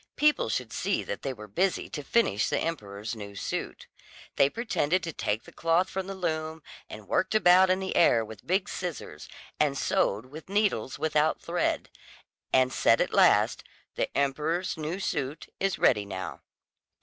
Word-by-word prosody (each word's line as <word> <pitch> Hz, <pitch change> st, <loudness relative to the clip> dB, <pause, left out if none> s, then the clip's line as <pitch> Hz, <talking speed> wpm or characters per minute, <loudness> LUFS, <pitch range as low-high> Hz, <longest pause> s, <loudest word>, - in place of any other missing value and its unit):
People 300 Hz, -, +3 dB
should 115 Hz, 0 st, -2 dB
see -, -, 0 dB
that 100 Hz, -, -5 dB
they 135 Hz, -, -2 dB
were 105 Hz, -4 st, -9 dB
busy 185 Hz, -, 0 dB
to 150 Hz, -, -5 dB
finish 140 Hz, -, +2 dB
the -, -, 0 dB
emperor's 105 Hz, -9 st, -4 dB
new 100 Hz, -2 st, -8 dB
suit. -, -, -4 dB, 0.5 s
They 140 Hz, -, +4 dB
pretended 185 Hz, -5 st, 0 dB
to 165 Hz, -, -4 dB
take 105 Hz, -3 st, -2 dB
the -, -, -14 dB
cloth 165 Hz, +3 st, +1 dB
from 190 Hz, 0 st, -3 dB
the 195 Hz, -, -5 dB
loom, 160 Hz, -3 st, -3 dB, 0.3 s
and 105 Hz, -2 st, -10 dB
worked 185 Hz, +3 st, 0 dB
about 185 Hz, -2 st, +6 dB
in 185 Hz, 0 st, +2 dB
the 190 Hz, -1 st, -3 dB
air 115 Hz, -9 st, +4 dB
with 110 Hz, -2 st, -12 dB
big 185 Hz, +2 st, +1 dB
scissors, 180 Hz, -4 st, -6 dB, 0.3 s
and 145 Hz, -2 st, +2 dB
sewed 105 Hz, -2 st, +1 dB
with 150 Hz, +7 st, -11 dB
needles 200 Hz, -, 0 dB
without 155 Hz, 0 st, +1 dB
thread, 175 Hz, +1 st, -1 dB, 0.6 s
and 130 Hz, 0 st, +3 dB
said -, -, +4 dB
at -, -, 0 dB
last: -, -, +4 dB, 0.3 s
"The -, -, -1 dB
emperor's 150 Hz, +6 st, 0 dB
new 160 Hz, +3 st, -4 dB
suit 150 Hz, -5 st, -3 dB
is 195 Hz, -1 st, 0 dB
ready 105 Hz, -4 st, +3 dB
now." 95 Hz, -1 st, -6 dB
155 Hz, 170 wpm, -28 LUFS, 115-185 Hz, 0.6 s, about